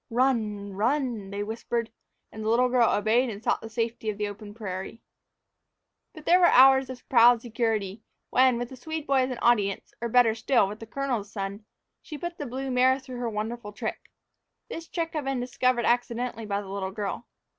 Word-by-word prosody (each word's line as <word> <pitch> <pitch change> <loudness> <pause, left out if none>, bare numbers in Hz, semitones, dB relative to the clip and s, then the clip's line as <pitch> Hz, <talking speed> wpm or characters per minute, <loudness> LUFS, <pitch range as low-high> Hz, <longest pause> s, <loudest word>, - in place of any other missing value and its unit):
"Run 220 -5 0
run!" 235 -1 -1
they 200 +1 -3
whispered, 225 +1 -3 0.4
and 220 - -7
the 215 - -1
little 250 +2 +3
girl 245 -2 +4
obeyed 225 +5 +2
and 210 0 -7
sought - - +1
the 225 - -8
safety 225 0 -2
of 210 - -3
the 210 0 -1
open 205 0 -9
prairie. 195 0 -6 1.1
But 310 -2 -12
there 355 +2 +5
were 350 - +6
hours 265 -1 +6
of 255 -2 -9
proud 235 -1 +6
security, 220 -4 -2 0.3
when, 255 -1 +4
with 245 0 -4
the 260 - -9
Swede 315 +4 -5
boy 275 -2 +3
as 255 0 +1
an 250 - -4
audience, 205 -5 +1
or, 235 - -2
better 240 -1 +5
still, 230 -1 +2
with 210 +2 -7
the 225 - -9
colonel's 240 -5 -3
son, 200 +1 -5 0.4
she 305 - -8
put 345 +3 -6
the 290 - -4
blue 265 +2 -4
mare 255 +1 +4
through 260 -2 -9
her 240 -1 -2
wonderful 215 0 -5
trick. 210 - -5 0.6
This 330 0 -7
trick 330 -1 -3
had 305 -3 -3
been 270 -1 -1
discovered 250 0 0
accidentally 240 -1 -1
by 200 0 -1
the 195 - -11
little 195 -1 -3
girl. 205 +4 -5
235 Hz, 200 wpm, -27 LUFS, 210-255 Hz, 1.1 s, were